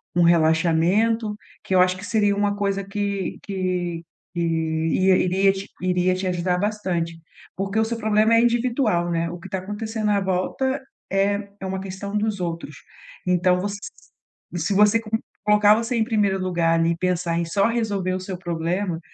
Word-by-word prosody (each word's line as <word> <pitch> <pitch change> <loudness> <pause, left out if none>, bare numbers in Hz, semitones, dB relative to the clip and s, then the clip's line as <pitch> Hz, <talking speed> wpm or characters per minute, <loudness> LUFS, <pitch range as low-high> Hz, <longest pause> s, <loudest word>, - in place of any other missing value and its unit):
um 175 - +4
relaxamento, 170 +7 +3 0.3
que - - -3
eu - - +5
acho 185 0 +3
que 195 - -8
seria 205 -2 +2
uma 205 0 0
coisa 200 -1 -1
que 200 -1 -3
que 180 -3 -2 0.3
que 170 - -1
iria 170 +4 +2
te 195 +1 -7
iria 180 0 +2
te 185 +1 -3
ajudar 180 0 0
bastante, 185 -5 -2 0.4
porque 195 +3 -1
o 220 - +3
seu 230 +1 -3
problema 220 0 +3
é 230 - +5
individual, 235 -6 +1
né, 165 0 0
o 175 +1 -7
que 195 - -10
está 190 0 -3
acontecendo 210 +2 -3
à 200 - +3
volta 230 +9 -1 0.3
é 200 +1 +1
é - - -4
uma 190 0 -3
questão 195 +2 -5
dos 210 -1 -1
outros. 165 -4 -4 0.5
Então 180 0 +3
você 205 0 -3 0.8
se 175 +4 -1
você 210 +3 +5
co 225 - -10 0.4
colocar 210 0 +6
você 230 +3 -1
em 225 - +2
primeiro 210 -4 +1
lugar 170 -3 +1
ali 165 0 +2
e 170 - -2
pensar 175 -1 0
em 170 - -1
só 200 +5 +2
resolver 205 -6 -1
o 185 - -2
seu 185 -1 -6
problema 175 0 -2
190 Hz, 175 wpm, -23 LUFS, 175-210 Hz, 0.8 s, colocar